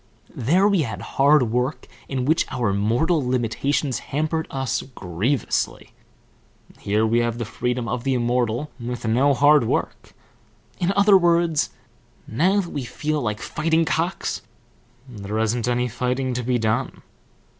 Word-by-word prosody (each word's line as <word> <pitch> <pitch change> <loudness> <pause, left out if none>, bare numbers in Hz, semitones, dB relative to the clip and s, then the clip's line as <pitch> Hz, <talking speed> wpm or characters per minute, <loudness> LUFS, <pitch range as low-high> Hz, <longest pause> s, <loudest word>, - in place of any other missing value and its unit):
There 175 - +3
we 200 -4 +2
had 110 -7 -4 0.2
hard 140 -5 +5
work 125 +5 -1 0.2
in 130 -2 -2
which 160 +4 +2
our 120 -6 -1
mortal 120 - +1
limitations 125 +2 -1
hampered 155 +2 -2
us 135 -2 -2
grievously; 115 - -2 0.9
here 105 +2 +1
we 115 +2 +2
have 120 -1 -1
the 115 - -3
freedom 125 +2 -2
of 120 - -3
the 135 -1 +1
immortal 120 +2 0
with 120 0 -5
no 130 +5 +3
hard 145 -1 +5
work; - - -3 0.6
in 180 +2 +1
other 200 0 +6
words, 170 -3 +2 0.6
now 185 - +2
that 175 - -8
we 145 - -3
feel 150 +5 -2
like 105 -2 -3
fighting 160 +1 0
cocks, 170 +4 -1 0.7
there 105 -3 -6
isn't 110 +1 0
any 125 0 +1
fighting 125 +2 -2
to 125 - -2
be 125 +1 0
done. 115 +3 -1
125 Hz, 145 wpm, -23 LUFS, 115-150 Hz, 0.9 s, other